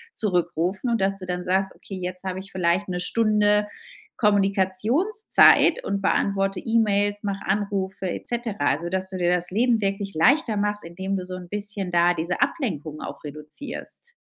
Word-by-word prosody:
zurückrufen 180 +2 0
und 230 - +1
dass 195 +1 0
du 185 - -7
dann 180 0 -3
sagst: 190 +1 0
„Okay, 195 - -9
jetzt 185 0 -5
hab 185 -1 -3
ich 190 +1 -9
vielleicht 180 +2 +1
'ne 180 -1 -3
Stunde 210 0 +2 0.5
Kommunikationszeit 210 - +3
und 200 0 -2
beantworte 195 0 +1
E-Mails, 205 -2 +1
mache 200 -1 -3
Anrufe 195 -1 -1
et - - -6
cetera,“ 235 -3 -3
also 150 +5 +1
dass 190 +1 -2
du 190 - -5
dir 175 0 +2
das 175 0 -3
Leben 230 +2 +2
wirklich 195 0 -2
leichter 230 - +3
machst, 205 -1 -1
indem 190 +3 -3
du 185 - -5
so 185 0 -6
'n 180 -1 -9
bisschen 205 -2 -3
da 175 0 +4
diese 170 +5 -3
Ablenkung 165 - -2
auch - - -8
reduzierst. 155 - -9
195 Hz, 170 wpm, -24 LUFS, 180-210 Hz, 0.5 s, da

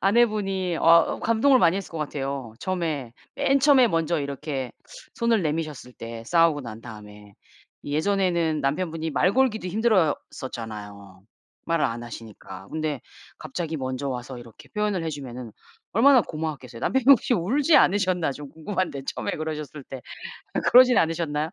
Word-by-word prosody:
아내분이 195 -4 +1
어 165 0 +4
감동을 230 +4 +4
많이 170 +1 +4
했을 195 - -6
것 165 - -5
같아요. 135 -5 -4
처음에 160 -10 -3 0.2
맨 275 0 +2
처음에 275 -3 +6
먼저 165 -3 0
이렇게 140 -2 -4 0.4
손을 230 -3 +1
내미셨을 155 -5 -3
때 115 -1 -8
싸우고 165 -2 +3
난 115 -2 -8
다음에. 105 -2 -12 0.5
예전에는 170 0 0
남편분이 160 +3 -2
말 180 +5 +2
걸기도 240 -6 +1
힘들었었잖아요. 115 - -2 0.4
말을 165 -2 +1
안 120 -1 -2
하시니까. 105 -5 -10
근데 155 -4 -2 0.4
갑자기 165 -2 -4
먼저 130 +1 -3
와서 125 0 -5
이렇게 120 -2 -14
표현을 210 -4 -1
해 - - -2
주면은 125 -5 -7 0.4
얼마나 255 +4 +6
고마웠겠어요. 150 - -6
남편분이 265 +1 +4
혹시 255 -1 +2
울지 270 - +3
않으셨나 185 -6 +3
좀 145 0 -10
궁금한데 160 -1 -3
처음에 - - -3
그러셨을 155 -2 -5
때. 130 -1 -9 0.7
그러진 250 0 +7
않으셨나요? 160 -1 0
160 Hz, 360 characters per minute, -25 LUFS, 130-195 Hz, 0.7 s, 그러진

